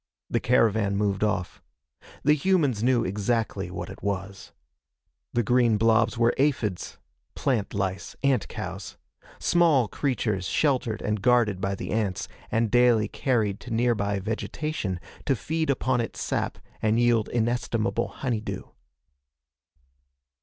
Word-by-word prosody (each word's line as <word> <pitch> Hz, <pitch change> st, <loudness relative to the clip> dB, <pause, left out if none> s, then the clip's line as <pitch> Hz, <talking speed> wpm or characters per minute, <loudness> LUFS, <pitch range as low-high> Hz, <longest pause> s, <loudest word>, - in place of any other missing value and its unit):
The -, -, +2 dB
caravan 110 Hz, -4 st, +2 dB
moved 100 Hz, -1 st, 0 dB
off. 105 Hz, -4 st, -1 dB, 0.6 s
The 150 Hz, -, +5 dB
humans 150 Hz, -, +2 dB
knew 125 Hz, -2 st, +3 dB
exactly 100 Hz, 0 st, -1 dB
what 90 Hz, -, -5 dB
it -, -, -11 dB
was. 100 Hz, -1 st, -4 dB, 0.8 s
The 120 Hz, -, +1 dB
green 120 Hz, -1 st, +3 dB
blobs 115 Hz, +1 st, +3 dB
were 115 Hz, 0 st, +3 dB
aphids 125 Hz, -10 st, 0 dB, 0.4 s
plant 120 Hz, -9 st, -1 dB
lice: 95 Hz, -1 st, -3 dB
ant 135 Hz, -5 st, +2 dB
cows -, -, -7 dB, 0.4 s
small 160 Hz, -9 st, +3 dB
creatures 110 Hz, -8 st, -1 dB
sheltered 130 Hz, -6 st, 0 dB
and 105 Hz, -1 st, -1 dB
guarded 110 Hz, -4 st, +3 dB
by 100 Hz, 0 st, -1 dB
the -, -, -6 dB
ants 100 Hz, -3 st, -1 dB, 0.2 s
and 115 Hz, -1 st, +1 dB
daily 120 Hz, -3 st, +4 dB
carried 110 Hz, -7 st, 0 dB
to 125 Hz, -, -10 dB
nearby 110 Hz, -4 st, +1 dB
vegetation 110 Hz, -, -3 dB, 0.3 s
to 135 Hz, -, +3 dB
feed 160 Hz, +7 st, -2 dB
upon 130 Hz, -2 st, +1 dB
its 115 Hz, -, -5 dB
sap -, -, -2 dB, 0.2 s
and 110 Hz, +1 st, +2 dB
yield 120 Hz, -2 st, +3 dB
inestimable 120 Hz, -1 st, 0 dB
honeydew. 120 Hz, -5 st, -3 dB
115 Hz, 125 wpm, -26 LUFS, 100-125 Hz, 0.8 s, The